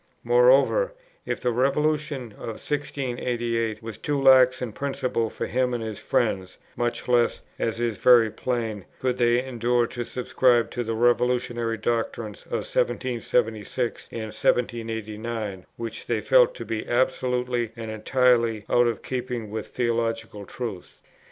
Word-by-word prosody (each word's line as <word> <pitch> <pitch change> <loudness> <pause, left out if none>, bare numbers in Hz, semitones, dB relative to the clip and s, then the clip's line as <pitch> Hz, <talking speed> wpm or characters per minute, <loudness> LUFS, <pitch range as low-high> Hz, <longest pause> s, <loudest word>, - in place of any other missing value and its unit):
Moreover, - - +4 0.3
if - - -2
the 125 - +1
Revolution 140 0 0
of 110 +1 -7
1688 120 -6 -2
was 115 -1 -7
too 145 -1 -1
lax 130 -2 +6
in 125 -3 -4
principle 130 -2 -1
for - - -4
him 125 0 0
and 115 - -3
his 110 -2 -5
friends, 95 -1 -1 0.2
much 120 0 -2
less, 120 -1 +2 0.2
as 115 0 -1
is 115 -4 -1
very 120 -3 +6
plain, 115 -6 -3
could 125 -1 -1
they 120 +1 +3
endure 120 -1 +1
to 120 +1 -5
subscribe 125 -1 +2
to 120 - -2
the 115 0 -2
revolutionary 120 -1 +1
doctrines 110 -1 -3
of - - -2
1776 125 - -1
and 115 - -5
1789, 110 -3 -2
which 115 -1 -6
they - - +1
felt - - +4
to - - -7
be 110 -1 -4
absolutely 125 -1 0
and 115 -1 -6
entirely 115 -1 +2
out 120 0 +5
of 115 -3 -2
keeping 125 -4 -4
with 110 0 -4
theological 115 -3 -2
truth. 110 -8 -7
120 Hz, 140 wpm, -25 LUFS, 115-125 Hz, 0.3 s, lax